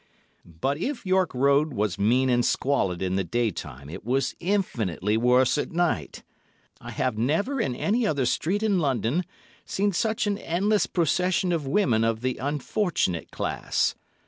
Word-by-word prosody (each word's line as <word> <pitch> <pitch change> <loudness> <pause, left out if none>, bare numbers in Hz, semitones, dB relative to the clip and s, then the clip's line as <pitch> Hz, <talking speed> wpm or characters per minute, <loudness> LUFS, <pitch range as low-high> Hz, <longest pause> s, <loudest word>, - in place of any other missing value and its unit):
But 90 - -3
if 255 - -3
York 185 -2 +2
Road 140 +3 +2
was 105 -5 -1
mean 125 +6 +3
and 120 -1 +2
squalid 100 -11 0
in 95 0 0
the 95 - +1
day 115 +5 0
time, 70 -5 -8
it 75 - -8
was 130 +4 0
infinitely 115 - -1
worse 125 +4 +3
at - - -2
night. 175 0 -1 0.6
I - - -8
have 125 -4 -2
never 200 - 0
in 125 - -1
any 220 - +1
other 140 -8 0
street 190 - 0
in 205 -4 +2
London 135 - 0 0.4
seen 200 +1 0
such 220 +4 0
an 205 0 -1
endless 200 +5 +1
procession 180 +2 +1
of 160 -5 -1
women 135 - +2
of 115 0 0
the 130 0 -1
unfortunate 145 - -1
class. - - -1
140 Hz, 160 wpm, -26 LUFS, 115-185 Hz, 0.6 s, mean